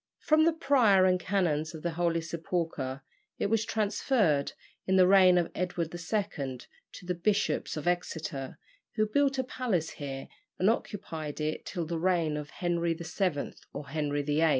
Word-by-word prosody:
From 310 +1 +3
the 335 - +4
Prior 245 - +4
and 185 -1 +3
Canons 165 -4 0
of 155 - -9
the 170 - 0
Holy 165 0 0
Sepulchre 160 -5 -3 0.3
it 200 - -1
was 225 -1 +3
transferred, 210 - +1 0.3
in 190 - +3
the 185 -1 +7
reign 185 -1 +6
of 175 -2 +1
Edward 180 -2 -2
II. 175 - -3 0.3
to - - -10
the 180 - -1
Bishops 195 -1 0
of 155 - -4
Exeter, 160 -6 -2 0.4
who 215 - +3
built 275 +5 +2
a 260 - +1
palace 235 -10 -1
here 135 -2 -6 0.3
and 190 +4 +4
occupied 165 -10 -5
it 155 0 -3
till 175 -4 -3
the 165 +1 -3
reign 170 -3 +1
of 150 0 -5
Henry 170 -1 -1
VII. 170 -2 -2 0.2
or 140 -1 -7
Henry 145 -1 -1
VIII. 150 +3 +2
175 Hz, 165 wpm, -29 LUFS, 155-200 Hz, 0.4 s, the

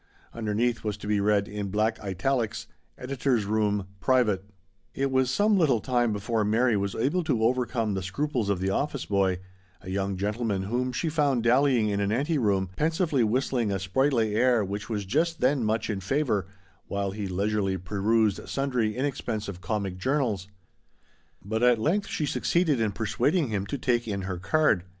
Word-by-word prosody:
Underneath 115 +1 -1
was 105 -1 -2
to 105 - -10
be 105 0 +1
read, 100 0 +2
in 105 -1 -4
black 110 +3 0
italics: 110 +4 -1 0.2
" - - -42
Editor's 125 -4 0
Room. 105 -1 0
Private? 110 -6 +2 0.5
It 135 0 0
was 130 -1 +2
some 205 +8 +3
little 135 -9 +3
time 120 -1 +1
before 105 +2 -1
Mary 115 +3 +2
was 100 0 -1
able 145 +10 0
to 125 -8 +1
overcome 120 -2 +1
the 95 - -2
scruples 120 +3 -2
of 100 -3 +1
the 95 +1 0
office 140 +5 -1
boy, 95 -2 +1 0.4
a 95 +1 -8
young 95 0 -1
gentleman 105 0 -1
whom 125 +5 -1
she 125 +7 -2
found 145 -6 +1
dallying 125 -1 +3
in 100 -1 -1
an 100 0 0
ante 145 +7 +1
room, 95 -5 +1
pensively 160 -4 +1
whistling 120 -1 0
a 100 - 0
sprightly 110 +3 +1
air 120 -1 +3
which 100 +3 -5
was 105 -3 -2
just 165 - 0
then 130 0 +2
much 110 +1 0
in 105 -3 -2
favour, 105 - 0 0.4
while 100 -1 -2
he 100 0 -4
leisurely 95 +1 0
perused 105 +3 0
sundry 125 -5 -1
in 130 - 0
expensive 105 -8 -4
comic 100 -3 -3
journals; 120 -7 0 1.0
but 110 +2 -2
at 125 -1 +5
length 175 - 0
she 155 - -2
succeeded 145 +2 +1
in 110 -2 +1
persuading 135 - 0
him 100 -2 -2
to 140 - -3
take 120 -2 0
in 100 -2 -3
her 95 -2 -4
card. 100 - +2
110 Hz, 180 wpm, -27 LUFS, 100-130 Hz, 1.0 s, at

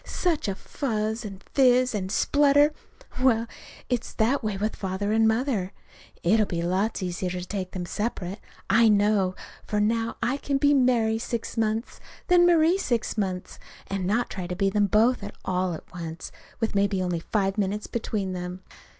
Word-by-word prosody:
such 340 -9 -1
a 195 - -1
fuss 220 -2 -3
and 195 -3 -8
fizz 255 -2 +4
and 190 -3 -3
splutter! 290 +5 +4 0.5
Well, 230 -3 +3 0.4
it's 245 -1 -2
that 240 +5 +1
way 210 -2 -2
with 215 +2 -2
Father 195 +1 -2
and 220 0 +4
Mother. 220 -5 0 0.5
It'll 210 +4 +3
be 170 -1 -2
lots 190 +4 0
easier 180 0 -2
to 180 0 -4
take 185 -1 -4
them 180 -2 -4
separate, 200 -1 -3 0.3
I 225 0 +5
know. 205 -3 +3 0.3
For 210 - -1
now 225 +2 0
I 250 +4 +1
can 280 -1 -1
be 285 +1 +4
Mary 240 -5 +3
six 230 0 -4
months, 225 +1 -1 0.3
then 350 -1 +6
Marie 340 +2 +4
six 240 - -1
months, 185 -4 -3 0.3
and 195 -2 -3
not 230 +5 0
try 185 -3 -5
to 180 - -4
be 195 +1 +1
them 205 0 +2
both 225 +3 +3 0.2
all 185 -1 0
at - - -9
once, 165 -1 -6 0.3
with 225 - -1
maybe 200 -1 +1
only 175 -2 -1
five 195 +3 -1
minutes 205 +1 -1
between 205 -4 -3
them. 180 +1 -6
215 Hz, 170 wpm, -26 LUFS, 190-235 Hz, 0.5 s, then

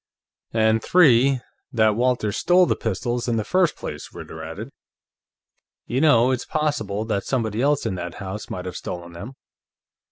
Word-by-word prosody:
"And, 110 0 +2
three, 135 -6 +5 0.3
that 110 -2 +3
Walters 120 -3 +1
stole 180 +1 +4
the - - +1
pistols 120 +3 -2
in 120 - +1
the 110 - 0
first 180 - +2
place," - - -7
Ritter - - -9
added. - - -7 1.1
"You 130 +3 -1
know, 130 -5 +5
it's 130 -1 -1
possible 110 -10 -2
that 100 -3 -1
somebody 115 -4 -1
else 145 -1 +2
in 110 - -1
that 90 -1 -6
house 100 +2 -6
might 90 0 -5
have 90 - -6
stolen 85 -1 -6
them." 85 +10 -8
115 Hz, 160 wpm, -23 LUFS, 105-135 Hz, 1.1 s, three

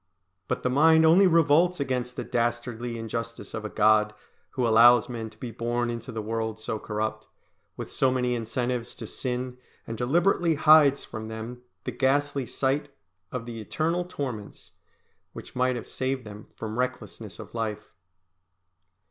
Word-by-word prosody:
But - - -2
the 125 - +1
mind 160 +4 +6
only 180 +5 +7
revolts 165 +1 +4
against 125 -2 -2
the 130 - -3
dastardly 120 0 -2
injustice 115 -1 -5
of 110 - -4
a 105 - -4
God, 105 0 +3 0.4
who 125 -3 +1
allows 115 +1 +7
men 115 -2 -5
to 110 - -21
be 120 0 -6
born 120 +1 -1
into 115 -1 -6
the 110 -1 -4
world 110 0 -3
so 110 0 -4
corrupt, 110 +1 -3 0.5
with - - -6
so 130 - +2
many 125 -1 0
incentives 120 +1 -2
to - - -7
sin, 125 0 -4 0.3
and 115 - -5
deliberately 170 +5 +2
hides 150 -2 +6
from 110 0 -7
them 110 +2 -7 0.2
the - - -3
ghastly 140 0 +1
sight 140 +2 0 0.4
of 125 -2 -4
the 115 -2 -6
eternal 165 - -1
torments, 125 - -6 0.6
which - - -10
might 125 0 +2
have 120 - -6
saved 130 0 -2
them 105 0 -10
from 110 +1 -5
recklessness 130 0 -4
of - - -10
life. 110 -3 -4
120 Hz, 155 wpm, -27 LUFS, 115-135 Hz, 0.6 s, only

